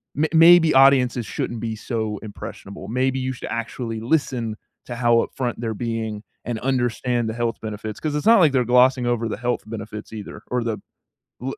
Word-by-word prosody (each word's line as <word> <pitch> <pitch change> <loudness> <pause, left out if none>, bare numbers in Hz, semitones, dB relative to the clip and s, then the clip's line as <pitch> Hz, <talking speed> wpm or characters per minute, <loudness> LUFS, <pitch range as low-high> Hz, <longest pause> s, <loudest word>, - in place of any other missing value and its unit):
may 155 +3 +1
maybe 165 0 +7
audiences 130 -3 +5
shouldn't 120 - -3
be 110 -1 -3
so 110 -2 -3
impressionable. 100 -2 -9
Maybe 130 +3 0
you 130 0 -2
should - - -8
actually 115 0 -4
listen 120 -4 0 0.3
to 120 - -6
how 120 -1 +3
upfront 125 -3 -3
they're 115 -1 -3
being 110 -2 -3 0.2
and 115 -2 -3
understand 120 -2 0
the - - -3
health 120 0 -2
benefits. 110 -1 -6
'Cause 150 -2 -2
it's 150 - -2
not 230 0 +7
like 160 -5 +5
they're 130 -2 +2
glossing 125 +1 +4
over 120 -1 0
the - - -4
health 120 +1 -1
benefits 110 -1 -7
either 105 -2 -8
or 125 -1 0
the 115 -2 -2 0.6
l 135 +1 -3
120 Hz, 185 wpm, -22 LUFS, 110-130 Hz, 0.6 s, maybe